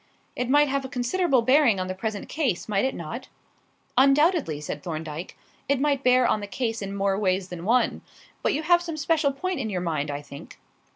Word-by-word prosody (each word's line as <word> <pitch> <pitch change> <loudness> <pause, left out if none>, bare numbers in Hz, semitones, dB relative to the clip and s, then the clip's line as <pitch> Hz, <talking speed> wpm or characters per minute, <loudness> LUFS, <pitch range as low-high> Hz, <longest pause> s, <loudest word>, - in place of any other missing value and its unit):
"It 250 0 -2
might 290 +2 +5
have 275 0 -1
a 265 - -6
considerable 260 +1 +1
bearing 255 -5 +4
on 185 - -1
the 185 - -3
present 205 +2 -4
case, 270 - -1
might 205 +2 +1
it 265 - -1
not?" 175 +10 -6 0.7
"Undoubtedly," 275 - +3
said 150 0 -5
Thorndyke. 160 0 -6 0.3
"It 280 -2 +2
might 280 -1 +1
bear 250 0 +5
on 215 - +2
the 205 - -6
case 225 +2 -3
in 200 0 -5
more 195 0 0
ways 185 -2 0
than 175 -1 -7
one. 245 +4 +2 0.4
But - - +1
you 305 - -2
have 345 +2 +4
some 335 -3 -5
special 305 -1 +1
point 355 +4 -3
in 225 -5 -2
your 185 -3 -2
mind, 155 -4 -2
I 145 0 -4
think." 140 0 -11
240 Hz, 210 wpm, -25 LUFS, 185-280 Hz, 0.7 s, might